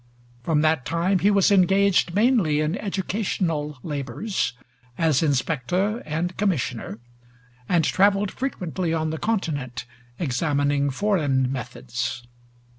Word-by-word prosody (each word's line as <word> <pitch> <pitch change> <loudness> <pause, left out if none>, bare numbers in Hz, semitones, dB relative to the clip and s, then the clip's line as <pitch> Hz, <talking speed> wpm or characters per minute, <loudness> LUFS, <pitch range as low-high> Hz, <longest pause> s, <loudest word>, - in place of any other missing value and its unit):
From 150 +4 +1
that 155 -3 +2
time 170 +7 +1
he 200 - +3
was 200 -1 +4
engaged 195 -1 +3
mainly 210 - +3
in 155 +3 0
educational 185 -7 -2
labors, 145 - -2 0.4
as 160 -5 +2
inspector 165 - 0
and 165 +4 -2
commissioner, 130 - -1 0.7
and 170 -2 +3
traveled 200 +1 +3
frequently 180 - -2
on 160 -1 -1
the 160 - -4
Continent 145 - -2 0.3
examining 145 -1 0
foreign 140 -6 +1
methods. 120 0 -4
160 Hz, 110 wpm, -24 LUFS, 140-195 Hz, 0.7 s, was